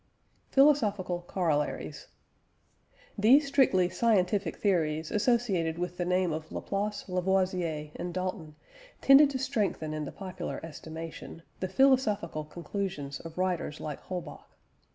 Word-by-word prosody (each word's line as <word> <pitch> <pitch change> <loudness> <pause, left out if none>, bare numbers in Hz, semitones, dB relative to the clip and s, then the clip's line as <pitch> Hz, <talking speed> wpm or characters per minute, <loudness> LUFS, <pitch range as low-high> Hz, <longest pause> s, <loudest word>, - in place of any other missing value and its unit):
PHILOSOPHICAL 205 -11 +3
COROLLARIES. 165 - -1 1.1
These 260 +8 +6
strictly 260 -10 +3
scientific 190 -2 +1
theories 160 -5 0
associated 205 -8 +1
with 180 0 -4
the 175 - -1
name 180 -2 +1
of 160 0 -6
Laplace, 205 +1 -3
Lavoisier, 180 -4 0
and 175 - -4
Dalton 185 -3 -4 0.4
tended 275 +1 +7
to 275 - -2
strengthen 205 - -1
in 155 -1 -3
the - - -6
popular 190 -2 -6
estimation, 165 +1 -8 0.2
the 185 - -2
philosophical 210 - +2
conclusions 170 -2 -5
of 165 0 -10
writers 180 -4 -1
like 150 -2 -6
Holbach. 180 -2 -7
185 Hz, 115 wpm, -29 LUFS, 165-205 Hz, 1.1 s, tended